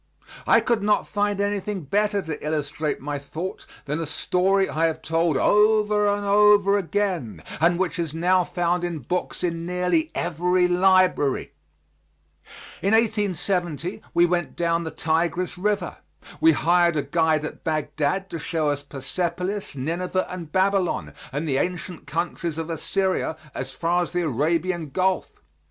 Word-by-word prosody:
I - - +6
could 235 -3 +1
not 210 +1 +1
find 205 -1 0
anything 205 -1 -1
better 205 +5 0
to 160 -1 -6
illustrate 150 0 -2
my 145 +1 -3
thought 160 +6 -6 0.2
than 150 +2 -2
a 165 - -3
story 190 +5 +1
I 165 -1 +1
have 160 0 -4
told 165 -2 +1
over 210 +1 +3
and 205 0 0
over 205 0 +5
again, 185 - -2 0.2
and 170 +2 +3
which 180 -1 -1
is 165 -3 -1
now 180 +3 +2
found 175 0 -1
in 170 -4 -3
books 180 +2 -3
in 165 -1 -1
nearly 180 -3 +1
every 180 +2 +1
library. 185 -5 +3 1.3
In 200 +3 +3
1870 185 -6 0
we 170 - +4
went 175 0 -1
down 170 0 0
the - - -2
Tigris 170 +3 -1
River. 200 -1 -1 0.4
We 160 0 +6
hired 170 +5 +3
a 145 - +1
guide 160 -2 +1
at - - -8
Bagdad 155 +3 -1
to 165 - -4
show 160 -1 -1
us 145 0 -3
Persepolis, 175 +8 -3
Nineveh 175 +7 -1
and 170 -4 -7
Babylon, 190 0 +1 0.2
and 145 +4 -3
the 135 -3 +1
ancient 180 0 -4
countries 165 +1 -2
of 165 +1 -4
Assyria 185 0 -1 0.2
as 130 +1 -5
far 170 +5 0
as 175 - -4
the 175 0 0
Arabian 165 +4 0
Gulf. 185 - -1
175 Hz, 150 wpm, -24 LUFS, 160-190 Hz, 1.3 s, I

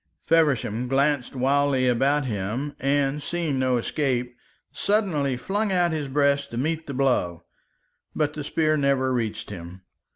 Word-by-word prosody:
Feversham 135 -8 +2
glanced 140 0 +1
wildly 135 0 +2
about 135 +4 +2
him, 115 +6 -3
and 140 +1 +1
seeing 155 -2 -2
no 130 -1 +2
escape, 125 -1 -1 0.4
suddenly 170 - 0
flung 200 - -1
out 175 -2 +2
his 155 -3 -2
breast 140 0 +1
to 115 - -6
meet 160 +5 -2
the 140 - -4
blow. 125 -11 0 0.7
But 150 -1 0
the 150 - -5
spear 155 +1 +1
never 135 -2 +1
reached 115 -4 -3
him. 90 0 -9
140 Hz, 140 wpm, -25 LUFS, 125-150 Hz, 0.7 s, Feversham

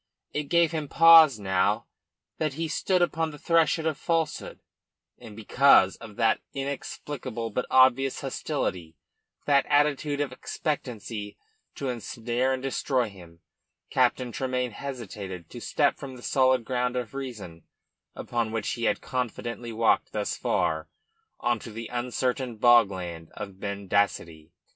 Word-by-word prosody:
It 150 - -2
gave 170 -2 +4
him 155 -3 -3
pause 160 -5 +7
now 95 +1 +1 0.5
that 155 -3 -1
he 165 +1 -2
stood 180 +3 +1
upon 165 -2 0
the 150 - -10
threshold 160 0 +2
of 155 -3 -1
falsehood; 165 -3 -2 0.6
and 115 -4 -11
because 110 -2 +5
of 110 -3 -11
that 115 0 +2
inexplicable 135 -3 -5
but 125 +4 -2
obvious 130 +1 +4
hostility, 85 -3 -3 0.5
that 140 -1 +3
attitude 145 0 +2
of 145 -2 -1
expectancy 120 -7 -4 0.4
to 135 - -3
ensnare 120 +1 -2
and 130 0 -2
destroy 130 -3 0
him, 85 -4 -15 0.5
Captain 125 -1 +2
Tremayne 125 -1 -2
hesitated 105 -9 -7
to 120 - -8
step 145 +3 +1
from 135 -2 -8
the 120 - -13
solid 130 -3 +2
ground 125 0 -1
of 125 -2 -3
reason, 110 - -7 0.5
upon 115 -2 -2
which 115 -1 -2
he 120 - -2
had - - +1
confidently 120 -1 -4
walked 115 0 +1
thus - - -2
far, - - -1 0.5
on 120 -1 0
to 115 - -9
the 115 +1 -7
uncertain 125 0 -2
bogland 95 -9 +3
of 100 -2 -8
mendacity. 100 -5 -2
125 Hz, 135 wpm, -27 LUFS, 105-140 Hz, 0.6 s, pause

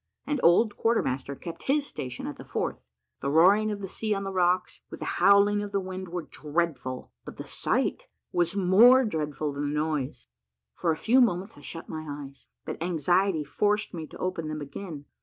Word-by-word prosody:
An 295 -2 -1
old 205 +6 +4
quarter 230 +1 +2
master 135 +2 -3
kept 170 +4 -8
his 285 +1 +3
station 125 - -6
at 145 - -5
the - - -9
fourth. - - -3 0.4
The 140 - -1
roaring 190 +8 +5
of 205 -1 -4
the 195 - -4
sea 215 +3 -2
on 195 - -3
the 195 0 -4
rocks, 180 0 +1
with - - -8
the - - -4 0.2
howling 200 +1 +5
of 205 -1 -5
the 200 - +1
wind, 185 0 -6
were 175 0 -4
dreadful; 150 -5 -3
but - - -10
the - - -5
sight - - -1 0.2
was 175 +2 +1
more 225 +8 +6
dreadful 150 -6 -2
than 145 +1 -2
the 150 - 0
noise. 150 -4 -2 0.5
For 170 - -2
a 155 - -1
few 250 +8 +4
moments 200 -1 +1
I - - -14
shut 165 - -7
my 155 0 -5
eyes, 140 -1 -8 0.2
but - - -6
anxiety 175 +1 +1
forced 210 +7 0
me 160 -3 -5
to - - -12
open 180 -4 -3
them 155 0 -4
again. 150 +1 -7
175 Hz, 200 wpm, -27 LUFS, 150-200 Hz, 0.5 s, more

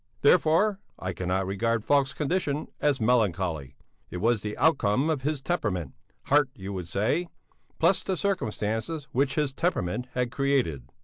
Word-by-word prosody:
Therefore 180 +6 +4 0.2
I 95 0 -4
cannot 95 +2 -1
regard 110 +3 -1
Falk's 140 -2 +3
condition 150 -1 -1
as 145 -3 +2
melancholy; 95 - +1 0.3
it - - -5
was 115 +3 +2
the 105 0 -5
outcome 140 -1 +2
of 145 -4 -1
his 145 0 -2
temperament 105 - -2 0.3
(heart 145 -1 +3
you 100 0 -6
would 90 -3 -5
say) 110 - 0 0.5
plus 170 +4 +3
the 190 -2 -2
circumstances 145 - -1
which 135 +1 +1
his 150 -3 0
temperament 125 - -1
had 125 -1 0
created. 135 - 0
125 Hz, 145 wpm, -27 LUFS, 100-150 Hz, 0.5 s, Therefore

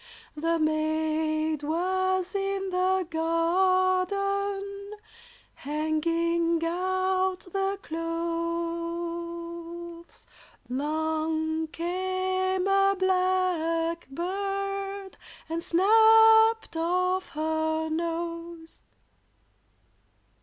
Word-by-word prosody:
The 330 +2 0
maid 310 0 0
was 370 +4 0
in 390 -1 -2
the 370 0 +1
garden, 375 +4 0 0.6
Hanging 330 +3 0
out 370 +1 0
the 390 0 0
clothes; 335 +1 -4 0.4
'Long 315 +3 -1
came 370 +2 -1
a 390 0 +3
blackbird 370 +2 -1 0.3
And 330 +1 -3
snapt 445 +3 +5
off 365 +3 0
her 315 0 0
nose. 335 0 -4
340 Hz, 55 wpm, -27 LUFS, 330-375 Hz, 0.6 s, snapt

